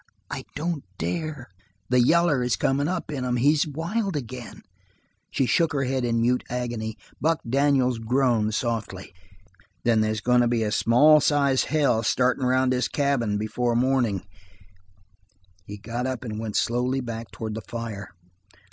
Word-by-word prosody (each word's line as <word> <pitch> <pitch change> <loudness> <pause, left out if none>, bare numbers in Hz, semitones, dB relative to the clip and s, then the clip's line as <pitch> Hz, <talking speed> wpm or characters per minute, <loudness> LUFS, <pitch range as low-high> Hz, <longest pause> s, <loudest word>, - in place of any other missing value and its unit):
"I - - -5
don't 160 -1 -2
dare." 130 - -4 0.4
"The 125 0 +4
yaller 160 +1 +3
is 125 -4 +1
comin' 135 +8 0
up 180 -2 -3
in 135 -3 -3
'em. 125 -1 0
He's 145 +5 +3
wild 175 +6 -2
again." 125 -3 -7 0.7
She 135 - 0
shook 165 +5 +2
her 135 -1 0
head 130 0 -1
in 115 -1 +1
mute 125 +2 +1
agony. 120 -3 -3 0.2
Buck 160 +1 +2
Daniels 130 -2 +2
groaned, 115 -2 +1
softly. 110 -6 -3 0.7
"Then 115 -2 +3
they's 110 0 0
goin' 125 +3 +3
to 120 - +3
be 115 -1 +1
a 105 - -1
small 145 +9 +5
sized 140 -3 +2
hell 140 -7 +2
started 125 +3 +1
around 130 0 +2
this 125 -1 +1
cabin 135 -8 0
before 115 +3 -1
mornin'." 120 -6 +1 1.4
He 105 - -7
got 115 +4 -4
up 130 -2 -4
and 110 -2 -5
went 110 -2 -5
slowly 125 +3 +1
back 115 -2 -6
towards 110 -1 -6
the 110 - -5
fire. 110 -4 -6
125 Hz, 155 wpm, -25 LUFS, 115-140 Hz, 1.4 s, small